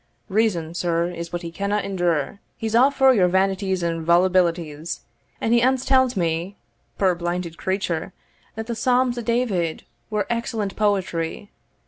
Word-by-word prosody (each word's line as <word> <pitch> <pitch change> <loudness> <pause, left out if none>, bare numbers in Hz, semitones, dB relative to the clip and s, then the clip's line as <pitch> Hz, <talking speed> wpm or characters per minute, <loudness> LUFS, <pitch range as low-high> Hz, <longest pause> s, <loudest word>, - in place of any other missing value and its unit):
Reason, 190 -6 +1
sir, 170 0 0
is 170 -1 -6
what 175 0 -4
he 170 - -5
canna 200 +4 -1
endure 175 -5 -1 0.2
he's 220 -1 -3
a' 250 +4 +6
for 265 -1 +4
your 190 -6 +4
vanities 190 0 +1
and 165 -1 -1
volubilities; 170 -2 +1 0.4
and 225 - +1
he 235 - +5
ance 260 +1 +2
tell'd 260 -3 +3
me 170 +3 -1 0.4
(puir 190 -2 +3
blinded 175 -1 -3
creature!) 190 -3 -2 0.4
that 220 0 -4
the 235 - -3
Psalms 250 +1 +1
of 235 - -6
David 210 -9 0 0.3
were 210 -1 0
excellent 230 -4 -2
poetry! 195 -3 -1
190 Hz, 150 wpm, -23 LUFS, 170-225 Hz, 0.4 s, a